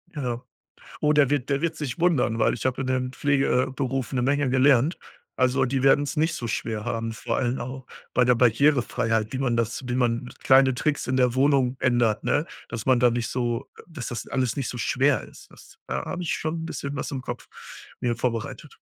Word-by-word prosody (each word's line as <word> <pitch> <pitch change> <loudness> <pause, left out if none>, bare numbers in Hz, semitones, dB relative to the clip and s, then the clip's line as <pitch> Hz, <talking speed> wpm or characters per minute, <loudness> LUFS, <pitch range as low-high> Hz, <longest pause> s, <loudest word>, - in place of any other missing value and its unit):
Ja. 125 -4 -3 0.6
Oh, 150 0 +3
der 145 -3 +4
wird 145 -3 0
der 140 0 +1
wird 165 -1 -1
sich 145 -1 -4
wundern, 155 -10 +2
weil 110 - +3
ich 120 - -7
habe 130 0 -1
in 130 - -4
dem 130 0 -1
Pflege 135 -3 +2
äh, - - -8
Beruf 135 -1 -2
'ne 125 - 0
Menge 140 +1 +1
gelernt. 130 +4 +4 0.4
Also, 130 +1 +3
die 130 +1 -1
werden's 145 +2 +3
nicht 160 +2 +1
so 120 - -4
schwer 110 -1 -3
haben, 115 0 -2
vor 115 +1 -3
allem 125 0 0
auch 130 +1 -6 0.3
bei 125 - +4
der 125 0 +4
Barrierefreiheit, 115 -3 +2
wie 130 - -2
man 125 -3 0
das 115 +2 -1
wie 125 - -2
man 120 0 0
kleine 130 -1 +5
Tricks 150 +3 -1
in 130 - 0
der 125 -1 +3
Wohnung 135 -2 +2
ändert, 120 -4 +2
ne? 150 +3 +1 0.2
Dass 115 0 -6
man 130 -2 +4
da 125 0 +5
nicht 120 0 -2
so 120 -2 -2
äh, - - -11
dass 160 -7 -6
das 120 -4 -5
alles 130 -1 -1
nicht 135 - -2
so 125 - -5
schwer 130 +1 +2
ist. - - -15
Das - - -17
da 65 +1 -3
hab - - -5
ich 175 - -1
schon 160 +1 -3
bisschen 140 -3 -5
was - - -3
im 135 -2 -4
Kopf 120 -1 -7 0.5
mir 120 -1 0
vorbereitet. 115 -2 -4
130 Hz, 215 wpm, -25 LUFS, 120-140 Hz, 0.6 s, kleine